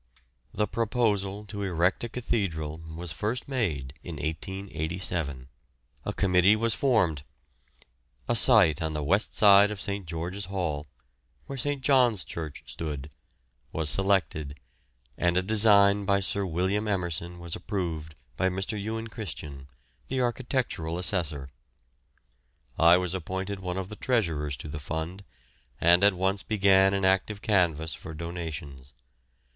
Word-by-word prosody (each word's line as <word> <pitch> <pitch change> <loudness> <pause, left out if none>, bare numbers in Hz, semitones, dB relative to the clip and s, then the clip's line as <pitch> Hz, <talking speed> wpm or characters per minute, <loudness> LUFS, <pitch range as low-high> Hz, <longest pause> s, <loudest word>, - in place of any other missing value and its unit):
The 105 - 0
proposal 105 -3 0
to 100 0 -6
erect 90 0 +1
a 120 - -3
cathedral 85 -11 -2
was 80 +1 -5
first 110 +8 -3
made 80 - -2
in 85 -1 -7
1887. 80 -3 -3 0.6
A - - -2
committee 95 +1 +4
was 115 +1 0
formed; 105 - +2 1.1
a 120 - +2
site 105 - +5
on 80 -1 -2
the 75 -1 -2
west 95 +9 +1
side 100 -1 +7
of 105 -2 -5
St. 100 -3 -4
George's 90 +4 -4
Hall 85 -6 -3 0.6
where 140 - -6
St. 140 +1 -2
John's 125 -9 +4
Church 80 -3 -6
stood 75 -2 -5 0.6
was 80 -2 0
selected, 80 -7 0 0.6
and 85 0 +2
a 90 - +2
design 100 -1 +5
by 100 0 +3
Sir 100 0 -1
William 95 +5 0
Emerson 90 -3 -2
was 85 -1 -5
approved 80 -6 -4 0.2
by 95 0 +2
Mr. 95 +3 -3
Ewan 110 +2 -4
Christian, 75 - -7 0.4
the 130 - -2
architectural 120 - -1
assessor. 80 -7 -1 1.2
I 85 +2 +6
was 90 -1 -1
appointed 95 +2 -4
one 90 -1 -4
of 95 0 -4
the 105 - -7
treasurers 80 - 0
to 65 - -8
the 75 0 -5
fund, 80 +6 -5 0.6
and 85 +3 +5
at 100 -1 +5
once 95 +2 0
began 95 -2 +4
an 95 -1 0
active 95 +2 +1
canvass 85 -7 +1
for 80 -4 -8
donations. 75 -5 -6
95 Hz, 135 wpm, -27 LUFS, 80-105 Hz, 1.2 s, side